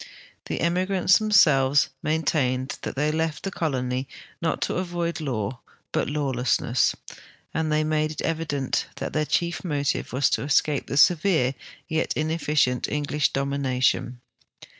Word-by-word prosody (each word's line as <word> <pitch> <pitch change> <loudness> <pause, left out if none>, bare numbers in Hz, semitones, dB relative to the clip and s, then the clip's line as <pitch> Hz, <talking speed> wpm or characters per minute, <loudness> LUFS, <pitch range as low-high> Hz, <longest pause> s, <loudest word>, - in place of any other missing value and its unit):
The - - -3
emigrants 185 +2 +3
themselves 145 -10 +4
maintained 140 -4 0
that - - -5
the}' 150 +2 +1
left 160 -1 -2
the 195 - -3
colony 130 -6 -2 0.3
not 165 - 0
to - - -1
avoid 175 -2 -2
law, 125 -4 -3 0.3
but - - 0
lawlessness, 130 -4 +1 0.6
and 160 -1 -1
they 155 0 +2
made 155 0 0
it 155 - -5
evident 155 -5 -1
that - - -5
their 155 0 +1
chief 170 +2 -1
motive 145 -5 -1
was 130 +2 +2
to - - +1
escai)e 145 0 +1
the 140 - -3
.severe 155 -4 +4 0.3
yet 160 -1 -1
ineflicient 155 -5 0
English 150 0 0
dom 140 0 -1
ination. 130 -2 0
150 Hz, 140 wpm, -25 LUFS, 135-160 Hz, 0.6 s, themselves